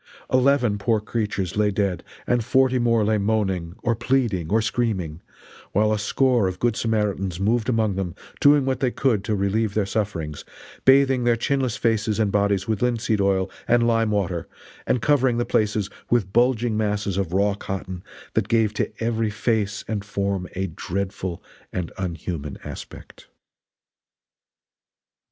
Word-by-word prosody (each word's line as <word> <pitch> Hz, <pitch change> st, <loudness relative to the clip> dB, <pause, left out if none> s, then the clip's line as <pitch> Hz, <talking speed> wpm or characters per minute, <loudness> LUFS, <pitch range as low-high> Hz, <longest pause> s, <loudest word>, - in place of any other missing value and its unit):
Eleven 130 Hz, -5 st, +3 dB
poor 110 Hz, +2 st, +2 dB
creatures 105 Hz, -4 st, -2 dB
lay 105 Hz, 0 st, +3 dB
dead 100 Hz, -3 st, -1 dB, 0.2 s
and 120 Hz, -1 st, +1 dB
forty 130 Hz, +1 st, +3 dB
more 115 Hz, -3 st, +2 dB
lay 110 Hz, 0 st, +2 dB
moaning, 95 Hz, -5 st, -1 dB
or 115 Hz, -1 st, +1 dB
pleading 115 Hz, -9 st, 0 dB
or 110 Hz, -, +3 dB
screaming, 100 Hz, -9 st, -1 dB, 0.5 s
while 105 Hz, +2 st, +3 dB
a 105 Hz, -, -1 dB
score 120 Hz, +1 st, +2 dB
of 90 Hz, 0 st, -3 dB
Good 120 Hz, +2 st, +1 dB
Samaritans 100 Hz, -6 st, -1 dB
moved 110 Hz, +4 st, +1 dB
among 110 Hz, -4 st, +1 dB
them 95 Hz, -3 st, -3 dB, 0.2 s
doing 145 Hz, -1 st, +5 dB
what 130 Hz, -2 st, 0 dB
they 130 Hz, -1 st, +2 dB
could 120 Hz, -5 st, +1 dB
to 105 Hz, -, 0 dB
relieve 100 Hz, +2 st, 0 dB
their 105 Hz, -2 st, +2 dB
sufferings; 95 Hz, -8 st, -3 dB, 0.4 s
bathing 135 Hz, -1 st, +5 dB
their 120 Hz, -1 st, +3 dB
chinless 130 Hz, 0 st, 0 dB
faces 110 Hz, -2 st, 0 dB
and 105 Hz, -3 st, +2 dB
bodies 100 Hz, -1 st, +1 dB
with 110 Hz, -3 st, -1 dB
linseed 115 Hz, -4 st, +1 dB
oil 95 Hz, -1 st, +1 dB, 0.2 s
and 120 Hz, 0 st, +4 dB
lime 115 Hz, -1 st, +2 dB
water 95 Hz, -5 st, -1 dB, 0.4 s
and 125 Hz, -2 st, +1 dB
covering 130 Hz, -5 st, +3 dB
the 120 Hz, -, 0 dB
places 105 Hz, -2 st, +1 dB, 0.2 s
with 105 Hz, -5 st, +1 dB
bulging 120 Hz, -1 st, +2 dB
masses 105 Hz, -2 st, -1 dB
of 95 Hz, -4 st, -1 dB
raw 100 Hz, +2 st, +2 dB
cotton 95 Hz, -2 st, -5 dB, 0.3 s
that -, -, +1 dB
gave 110 Hz, -2 st, +2 dB
to -, -, -1 dB
every 115 Hz, -1 st, 0 dB
face 105 Hz, -1 st, -1 dB
and 105 Hz, -2 st, -2 dB
form 100 Hz, -2 st, -2 dB
a 95 Hz, +1 st, -1 dB
dreadful 95 Hz, +1 st, -4 dB, 0.3 s
and 90 Hz, -3 st, -3 dB
unhuman 85 Hz, -5 st, -4 dB
aspect. -, -, -10 dB
105 Hz, 155 wpm, -23 LUFS, 95-120 Hz, 0.5 s, doing